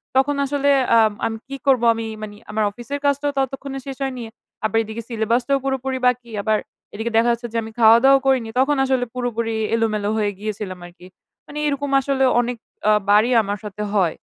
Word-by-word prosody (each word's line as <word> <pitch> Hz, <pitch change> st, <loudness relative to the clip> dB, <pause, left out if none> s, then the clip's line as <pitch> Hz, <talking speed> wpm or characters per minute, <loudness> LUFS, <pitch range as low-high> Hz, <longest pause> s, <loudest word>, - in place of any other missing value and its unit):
তখন 270 Hz, +2 st, +3 dB
আসলে 285 Hz, 0 st, 0 dB, 0.3 s
আ -, -, +7 dB, 0.3 s
আমি 225 Hz, 0 st, -2 dB
কি 275 Hz, -, -6 dB
করব? 260 Hz, -3 st, +4 dB
আমি 225 Hz, 0 st, -4 dB, 0.2 s
মানি 205 Hz, -1 st, -7 dB
আমার 215 Hz, 0 st, 0 dB
অফিসের 240 Hz, +6 st, -6 dB
কাজটাও 285 Hz, +1 st, +1 dB
ততক্ষণে 270 Hz, +1 st, -3 dB
শেষ 270 Hz, -, -6 dB
হয়নি। 255 Hz, -3 st, -4 dB, 0.4 s
আবার 220 Hz, +1 st, +1 dB
এইদিকে 220 Hz, +1 st, -6 dB
সিলেবাসটাও 235 Hz, +4 st, 0 dB
পুরোপুরি 265 Hz, -1 st, -1 dB
বাকি। 245 Hz, -2 st, -1 dB
আবার 215 Hz, +1 st, +1 dB, 0.4 s
এইদিকে 225 Hz, +3 st, -3 dB
দেখা 230 Hz, +1 st, +4 dB
যাচ্ছে 235 Hz, +1 st, -3 dB
যে, 230 Hz, -, -1 dB
আমি 220 Hz, -, -8 dB
খাওয়া-দাওয়াও 235 Hz, +5 st, +6 dB
করিনি। 255 Hz, -4 st, +2 dB
তখন 290 Hz, +3 st, +3 dB
আসলে 260 Hz, -2 st, +1 dB
পুরোপুরি 230 Hz, -2 st, -2 dB, 0.2 s
এলোমেলো 215 Hz, -2 st, 0 dB
হয়ে 210 Hz, -2 st, 0 dB
গিয়েছিলাম 205 Hz, -3 st, -5 dB
আরকি। 175 Hz, +1 st, -14 dB, 0.4 s
মানি 300 Hz, +1 st, -6 dB
এরকম 285 Hz, 0 st, -2 dB
আসলে 270 Hz, 0 st, 0 dB, 0.2 s
অনেক 245 Hz, 0 st, -3 dB, 0.3 s
আ -, -, +6 dB, 0.2 s
বারই 215 Hz, +4 st, +5 dB
আমার 205 Hz, 0 st, -3 dB
সাথে 210 Hz, 0 st, -5 dB
হয়। 185 Hz, -6 st, +2 dB
235 Hz, 180 wpm, -21 LUFS, 220-270 Hz, 0.4 s, আ